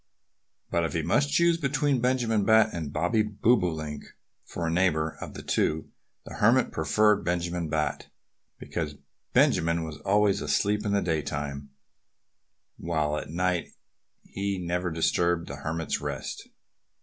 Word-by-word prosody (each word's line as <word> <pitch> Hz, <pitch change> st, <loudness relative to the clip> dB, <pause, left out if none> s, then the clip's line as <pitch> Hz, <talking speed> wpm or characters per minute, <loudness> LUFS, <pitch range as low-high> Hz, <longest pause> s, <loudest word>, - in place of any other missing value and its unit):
But 85 Hz, -, +1 dB
if 80 Hz, -3 st, -2 dB
he 80 Hz, -, -1 dB
must 145 Hz, -, +2 dB
choose 170 Hz, +1 st, +3 dB
between 140 Hz, -2 st, +1 dB
Benjamin 120 Hz, -4 st, +1 dB
Bat 110 Hz, +1 st, +4 dB
and 80 Hz, -4 st, -4 dB
Bobby 85 Hz, +9 st, +1 dB
Bobolink 90 Hz, -9 st, 0 dB, 0.4 s
for 85 Hz, -, -5 dB
a 80 Hz, -, 0 dB
neighbor, 80 Hz, -3 st, +1 dB
of -, -, -7 dB
the -, -, -7 dB
two 80 Hz, 0 st, 0 dB, 0.3 s
the -, -, -9 dB
Hermit 120 Hz, +4 st, +4 dB
preferred 105 Hz, +6 st, +2 dB
Benjamin 85 Hz, -1 st, -2 dB
Bat, 75 Hz, -1 st, -1 dB, 0.5 s
because 75 Hz, -4 st, -4 dB, 0.4 s
Benjamin 85 Hz, +1 st, +3 dB
was 80 Hz, -1 st, -6 dB
always 100 Hz, +3 st, +2 dB
asleep 105 Hz, +1 st, 0 dB
in 100 Hz, -, 0 dB
the 100 Hz, -, +2 dB
daytime, 75 Hz, -4 st, -3 dB, 1.1 s
while 75 Hz, -3 st, -1 dB
at 75 Hz, -, -5 dB
night 90 Hz, +1 st, -1 dB, 0.5 s
he 100 Hz, 0 st, -3 dB
never 90 Hz, 0 st, -2 dB
disturbed 85 Hz, +1 st, +1 dB
the 70 Hz, -, -6 dB
Hermit's 80 Hz, +3 st, -3 dB
rest. -, -, -5 dB
85 Hz, 135 wpm, -27 LUFS, 80-105 Hz, 1.1 s, Bat